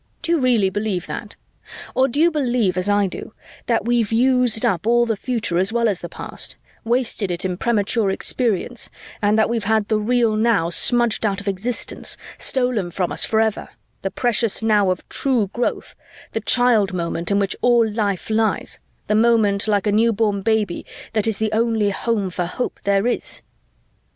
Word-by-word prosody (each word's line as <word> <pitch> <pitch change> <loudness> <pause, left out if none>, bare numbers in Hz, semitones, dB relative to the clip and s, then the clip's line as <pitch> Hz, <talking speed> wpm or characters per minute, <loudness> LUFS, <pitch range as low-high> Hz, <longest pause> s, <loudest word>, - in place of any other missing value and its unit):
Do 335 - -1
you 340 - +3
really 235 -7 +2
believe 205 -3 -2
that? 215 -3 -7 0.6
Or 260 +1 +3
do 275 +3 -3
you 340 +2 +4
believe, 245 - 0
as 185 +2 -1
I 205 0 +3
do, 190 - -7 0.3
that - - +1
we've 235 -3 +1
used 245 -1 +2
up 190 +3 0
all 240 0 +4
the 225 -2 -1
future 215 -6 -2
as 190 +3 +2
well 235 0 +1
as 200 -5 -1
the 175 - -6
past, - - -6 0.3
wasted 235 -4 0
it 175 +1 -2
in 180 -1 -1
premature 215 0 0
experience, 235 +3 -1 0.3
and 210 +1 +2
that 220 - +3
we've 230 -3 -2
had 220 -1 +1
the 215 -1 +2
real 230 0 +1
now 215 -7 +2
smudged 240 +4 +3
out 200 -2 0
of 200 - -9
existence, 200 +5 -2 0.2
stolen 245 -8 0
from 175 +1 -2
us - - +2
forever, 220 -1 0 0.3
the 195 - -2
precious 230 -1 0
now 210 -3 +3
of 185 -1 -3
true 240 -8 0
growth, 240 - -2 0.4
the - - -3
child 230 -6 +3
moment 170 -1 -3
in 200 - +2
which 200 -1 0
all 240 -2 +4
life 210 -2 -2
lies, 220 0 0 0.3
the - - 0
moment 215 -2 +3
like 205 -1 +1
a 210 - +2
newborn 215 -2 +2
baby 215 -4 0 0.3
that 215 -1 +1
is 220 -3 +1
the 220 -1 -1
only 220 -2 +1
home 205 -2 -1
for 180 0 -2
hope 245 +8 -4
there 200 +1 +2
is?" 245 - -2
220 Hz, 180 wpm, -21 LUFS, 200-235 Hz, 0.6 s, you